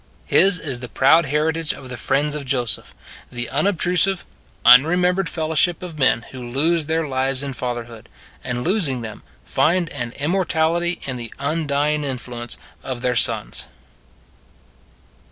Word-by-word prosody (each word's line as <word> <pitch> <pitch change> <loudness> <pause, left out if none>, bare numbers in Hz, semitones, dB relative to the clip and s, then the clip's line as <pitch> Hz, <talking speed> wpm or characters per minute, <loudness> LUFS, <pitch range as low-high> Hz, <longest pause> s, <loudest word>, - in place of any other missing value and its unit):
His 195 0 +5
is 140 -7 -3
the 125 0 -7
proud 150 +4 +4
heritage 155 +2 0
of 130 - -11
the 125 - -5
friends 145 +5 0
of 150 -1 -4
Joseph 125 -4 -2 0.4
the 120 -1 -4
unobtrusive, 180 +4 +1 0.4
unremembered 180 +9 +5
fellowship 160 +2 0
of 165 -4 -8
men 120 -3 +3
who 130 - -9
lose 145 +6 0
their 160 0 0
lives 135 0 0
in 140 -1 -4
fatherhood 120 -2 -6 0.3
and 125 -1 -3
losing 165 - +1
them, 110 -2 -7 0.2
find 175 0 +1
an 120 -4 -5
immortality 170 +1 0
in 130 -2 -3
the 115 -2 -8
undying 150 0 0
influence 125 -3 -5 0.2
of 130 -2 -5
their 125 -1 +1
sons. 115 -3 +1
140 Hz, 135 wpm, -21 LUFS, 125-165 Hz, 0.4 s, His